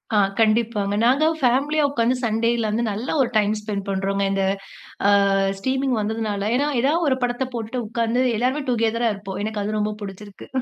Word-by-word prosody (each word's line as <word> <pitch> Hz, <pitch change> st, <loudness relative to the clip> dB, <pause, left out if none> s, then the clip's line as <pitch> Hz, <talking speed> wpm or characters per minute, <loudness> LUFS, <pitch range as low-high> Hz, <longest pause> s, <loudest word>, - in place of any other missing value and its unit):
ஆ, -, -, +4 dB, 0.2 s
கண்டிப்பாங்க, 215 Hz, -2 st, +2 dB
நாங்க 265 Hz, +6 st, +4 dB, 0.2 s
பேமிலியா 275 Hz, +5 st, +2 dB
உட்கார்ந்து, 245 Hz, -2 st, +1 dB
சண்டேல 230 Hz, 0 st, +1 dB
வந்து 230 Hz, +2 st, 0 dB
நல்ல 215 Hz, +5 st, -4 dB
ஒரு 245 Hz, -, +1 dB
டைம் 210 Hz, 0 st, +2 dB
ஸ்பெண்ட் 205 Hz, -2 st, -4 dB
பண்ணுறோங்க, 195 Hz, 0 st, -1 dB
இந்த 195 Hz, 0 st, 0 dB, 0.7 s
ஆ -, -, +6 dB, 0.5 s
ஸ்ட்ரீமிங் 260 Hz, +2 st, 0 dB
வந்ததனால, 210 Hz, -1 st, -2 dB
ஏனா 285 Hz, +3 st, +1 dB
ஏதா 275 Hz, +4 st, +2 dB, 0.2 s
ஒரு 260 Hz, -, +2 dB
படத்தை 245 Hz, +1 st, 0 dB
போட்டுட்டு 235 Hz, +1 st, -3 dB
உட்கார்ந்து, 230 Hz, +2 st, 0 dB, 0.2 s
எல்லாருமே 260 Hz, +5 st, 0 dB
டுகெதரா 230 Hz, 0 st, +1 dB
இருப்போம், 195 Hz, -1 st, -7 dB
எனக்கு 215 Hz, -1 st, -3 dB
அது 215 Hz, +1 st, -2 dB
ரொம்ப 210 Hz, 0 st, 0 dB
பிடிச்சிருக்கு. 200 Hz, 0 st, -9 dB
225 Hz, 165 wpm, -22 LUFS, 210-245 Hz, 0.7 s, ஆ